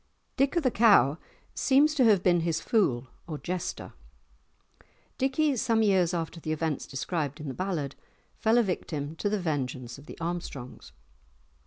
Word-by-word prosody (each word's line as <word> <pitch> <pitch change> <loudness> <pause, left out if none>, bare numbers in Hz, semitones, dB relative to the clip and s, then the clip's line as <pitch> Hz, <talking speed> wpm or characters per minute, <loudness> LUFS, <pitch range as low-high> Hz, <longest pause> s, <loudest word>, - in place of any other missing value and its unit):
Dick 275 +4 +1
o' - - +6
the 260 -6 +1
Cow 190 - +5 0.3
seems 290 +3 +3
to 285 -4 +3
have 205 -5 +4
been 175 -2 +4
his 165 -1 0
fool 135 - +1 0.2
or 155 -3 -4
jester. 180 +3 -5 1.3
Dickie, 270 +2 +2
some 225 0 +2
years 190 -5 +3
after 165 -1 -3
the 155 - -4
events 155 -2 -2
described 145 +1 -3
in 150 - -6
the 135 - -3
ballad, 165 -7 -3 0.4
fell 225 +1 +2
a 240 - +5
victim 155 -6 -3
to 205 - -1
the 210 0 0
vengeance 130 -7 -3
of 145 - -16
the - - -10
Armstrongs. 165 -7 -6
175 Hz, 160 wpm, -28 LUFS, 150-220 Hz, 1.3 s, o